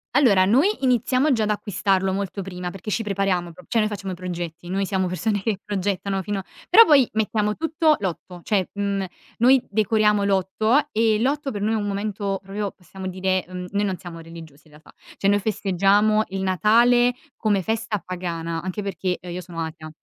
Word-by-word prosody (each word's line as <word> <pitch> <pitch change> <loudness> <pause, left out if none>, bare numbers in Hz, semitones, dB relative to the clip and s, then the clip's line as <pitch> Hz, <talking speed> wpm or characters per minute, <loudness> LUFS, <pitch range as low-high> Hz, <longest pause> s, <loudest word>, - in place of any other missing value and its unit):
Allora, 210 -10 +5
noi 255 - +4 0.2
iniziamo 255 +3 +2
già 225 -4 +2
ad 210 - 0
acquistarlo 195 -2 0
molto 195 0 -3
prima, 180 -1 -5
perché 195 +3 -7
ci 225 - 0
prepariamo 195 -4 -1
pro 180 - -15
cioè, 230 - 0
noi 215 - +2
facciamo 200 -2 -5
i - - -4
progetti, 175 -1 -6
noi 195 +2 -1
siamo 190 -1 0
persone 205 +3 -1
che 210 -2 -1
progettano 195 -1 -2
fino 195 +1 -3 0.3
però 450 +5 +9
poi 275 -5 +5
mettiamo 210 -1 0
tutto 315 -1 +2
l'8 180 -1 -5
cioè, 195 -4 0
mhmm, 200 -1 -1 0.3
noi 255 +2 +4
decoriamo 210 -1 +2
l'8 215 +9 +1
e 220 -1 +2
l'8 280 +2 0
per 205 -2 -5
noi 220 +2 +1
è - - +1
un 205 -1 -2
momento 200 -1 -2
proprio, 200 +1 -4
possiamo 190 +1 -9
dire, 185 0 -1
mhmm, 180 0 -6
noi 205 0 0
non 190 -2 -1
siamo 170 -2 -9
religiosi 160 -3 -12
in 155 - -21
realtà. 150 +1 -17 0.2
Cioè, 200 - +1
noi 205 0 +3
festeggiamo 205 +1 +2
il 190 0 -4
Natale 235 +6 +4 0.2
come 205 -4 +1
festa 220 +1 -2
pagana 170 -2 -4
anche 185 +3 -4
perché, 190 -2 -2
ehm, 180 -1 -9
io 180 - -4
sono 170 -2 -7
atea, 155 0 -7
200 Hz, 190 wpm, -23 LUFS, 185-215 Hz, 0.3 s, però